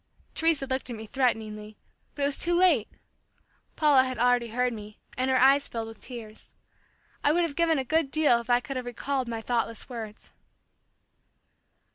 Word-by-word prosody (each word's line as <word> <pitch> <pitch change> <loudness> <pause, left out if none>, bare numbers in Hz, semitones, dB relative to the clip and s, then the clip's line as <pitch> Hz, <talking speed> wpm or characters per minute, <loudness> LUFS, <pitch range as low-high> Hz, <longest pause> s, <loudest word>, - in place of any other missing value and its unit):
Teresa 325 -4 +1
looked 260 0 -2
at 240 - -4
me 220 0 -8
threateningly, 215 -4 -2 0.4
but 285 - -3
it - - +4
was 280 0 +1
too 345 0 +2
late! 345 - +4 0.9
Paula 290 -4 +5
had 255 -1 -4
already 245 0 +2
heard 250 +2 0
me 210 -1 -10 0.2
and 255 +1 0
her 260 - +3
eyes 275 +2 +5
filled 225 -1 -5
with 225 - -13
tears. 225 -4 -9 0.7
I 290 - +4
would 345 +3 +2
have 320 -4 -3
given 330 -2 +2
a 265 - 0
good 315 +2 +1
deal 290 -6 +3
if 235 - -16
I 245 0 +4
could 270 +1 -5
have 250 -1 -5
recalled 260 +2 -2
my 230 -1 -4
thoughtless 230 0 -2
words. 225 -3 -8
250 Hz, 180 wpm, -27 LUFS, 230-280 Hz, 0.9 s, Paula